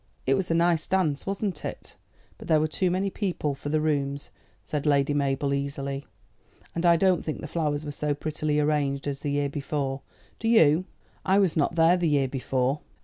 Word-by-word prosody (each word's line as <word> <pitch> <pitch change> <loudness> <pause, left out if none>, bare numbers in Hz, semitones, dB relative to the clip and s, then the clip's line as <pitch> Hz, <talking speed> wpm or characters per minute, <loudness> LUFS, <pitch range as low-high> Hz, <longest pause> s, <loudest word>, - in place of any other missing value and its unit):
"It 135 - +3
was 185 +4 0
a 165 - +2
nice 170 -1 +2
dance, 175 -6 0
wasn't 195 -4 -2
it? - - -7 0.4
but - - -10
there 155 -1 +4
were 155 - +1
too 180 +4 0
many 190 +2 0
people 180 -8 -2
for 140 +1 -6
the 155 +1 +2
rooms," 140 -2 -1 0.3
said 150 -1 -3
Lady 145 0 +3
Mabel 140 0 0
easily; 140 0 -3 0.7
"and 170 +1 +1
I 170 - +7
don't 185 +1 +2
think 155 - -4
the - - -6
flowers 150 -1 -1
were 145 - -4
so 145 0 -1
prettily 150 0 -1
arranged 145 -2 0
as 140 -1 -3
the 145 - -3
year 145 0 +1
before. 140 -1 -3 0.4
Do 225 - -2
you?" 170 -6 +5 0.4
"I 190 +1 +3
was 190 -5 +3
not 155 +2 +1
there 165 +2 +5
the 175 -2 +1
year 140 -2 +2
before." 130 +1 -1
150 Hz, 200 wpm, -26 LUFS, 140-170 Hz, 0.7 s, I